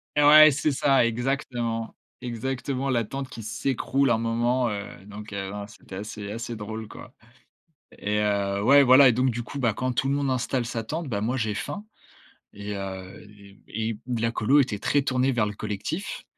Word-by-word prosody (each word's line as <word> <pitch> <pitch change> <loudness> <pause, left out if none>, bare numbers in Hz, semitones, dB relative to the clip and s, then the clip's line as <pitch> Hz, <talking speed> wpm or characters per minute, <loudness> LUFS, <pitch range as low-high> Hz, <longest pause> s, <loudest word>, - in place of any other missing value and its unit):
Et 150 - +4
ouais, 155 +1 +9
c'est 145 +2 0
ça, 135 -2 +3
exactement. 120 -2 -2 0.3
Exactement, 130 +2 -3
la 120 -3 +1
tente 135 +4 -6
qui 115 - -9
s'écroule 135 +4 0
un 115 - +3
moment, 120 +2 +1
heu, 100 0 -4 0.2
donc, 105 +1 -10
heu, 95 -1 -4
non, 100 0 -6
c'était 105 -3 -12
assez 105 0 -6
assez 115 +2 -5
drôle 110 +1 -6
quoi 105 +2 -12 0.9
et 105 +1 -1
heu, 100 -1 0
ouais, 140 +6 +7
voilà 130 +1 +8
et - - +5
donc 130 +3 +2
du 120 0 -4
coup, 140 - -8
bah, 120 -4 +2
quand 130 +4 -2
tout 130 +2 0
le - - +2
monde 140 -1 0
installe 130 -1 -1
sa 115 -1 -4
tente, 160 +6 -4
bah, 100 -4 -2
moi 120 +4 0
j'ai 110 -3 -1
faim 205 - -5 0.7
et 100 0 -6
heu, 95 -1 -7
les 100 -1 -17
et 110 0 -3
d 120 -2 -2
la 115 0 +1
colo 130 +6 +3
était 110 -6 -2
très 145 +7 +2
tournée 130 -1 +1
vers 115 -3 +2
le 105 - -4
collectif. 105 - -5
115 Hz, 200 wpm, -25 LUFS, 105-135 Hz, 0.9 s, ouais